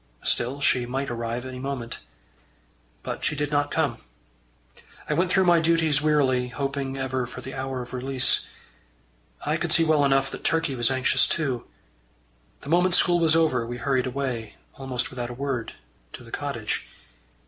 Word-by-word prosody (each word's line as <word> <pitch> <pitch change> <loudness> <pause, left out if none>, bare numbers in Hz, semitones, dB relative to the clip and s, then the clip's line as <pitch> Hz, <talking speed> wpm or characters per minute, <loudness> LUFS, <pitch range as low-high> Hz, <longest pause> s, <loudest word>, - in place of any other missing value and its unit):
Still 130 +4 +1
she 125 -3 +2
might 135 +1 -2
arrive 120 +1 -3
any 130 -1 -6
moment. 130 -3 -4 1.0
But - - -5
she 155 - +1
did 145 0 -2
not 145 0 +1
come. - - 0 1.1
I - - 0
went 180 +4 +1
through 190 - +4
my 175 -1 +5
duties 160 -3 +3
wearily, 135 -5 +2
hoping 135 +1 -3
ever 130 -2 -2
for 125 - -9
the 135 +1 -8
hour 130 -1 -3
of 120 - -13
release. 130 0 +1 1.0
I 150 +2 +1
could 170 0 -2
see 165 - +6
well 155 -2 +3
enough 135 -1 +2
that - - -8
Turkey 165 -3 +1
was 120 -1 +2
anxious 130 -1 +3
too. 135 -7 -1 1.0
The 140 - -9
moment 175 +2 +4
school 175 -1 +4
was 165 -1 +4
over, 155 -7 +3
we 120 +1 -5
hurried 130 0 0
away, 125 -5 -3 0.2
almost 130 -2 -4
without 120 -2 -4
a 120 - -7
word, 135 -3 -3 0.4
to - - -9
the - - -14
cottage. - - -3
135 Hz, 170 wpm, -25 LUFS, 125-150 Hz, 1.1 s, see